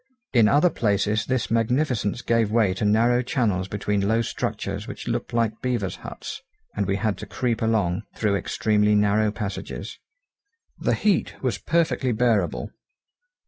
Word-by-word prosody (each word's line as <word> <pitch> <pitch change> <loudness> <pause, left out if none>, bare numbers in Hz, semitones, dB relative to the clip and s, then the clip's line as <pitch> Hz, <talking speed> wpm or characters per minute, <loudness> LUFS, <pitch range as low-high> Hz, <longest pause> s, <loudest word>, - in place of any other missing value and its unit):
In 115 -4 +6
other 150 +8 +4
places 105 -3 0
this 130 -4 -1
magnificence 115 -1 +1
gave 115 -2 +2
way 110 -4 +3
to 95 - -2
narrow 115 +4 +3
channels 105 -7 0
between 100 0 -1
low 115 +2 +2
structures - - -3
which - - -8
looked - - -2
like 115 -2 0
beaver's 120 -7 -1
huts, - - -8 0.3
and 100 -2 -1
we 100 - +1
had 105 0 -1
to - - -7
creep 120 -3 -1
along 105 -5 +1
through 105 -2 +1
extremely 105 +1 +1
narrow 105 +1 +3
passages. 105 -1 -5 0.8
The - - +1
heat 205 -4 +1
was 130 - 0
perfectly 155 -6 +1
bearable. 110 -6 +1
110 Hz, 145 wpm, -24 LUFS, 105-120 Hz, 0.8 s, In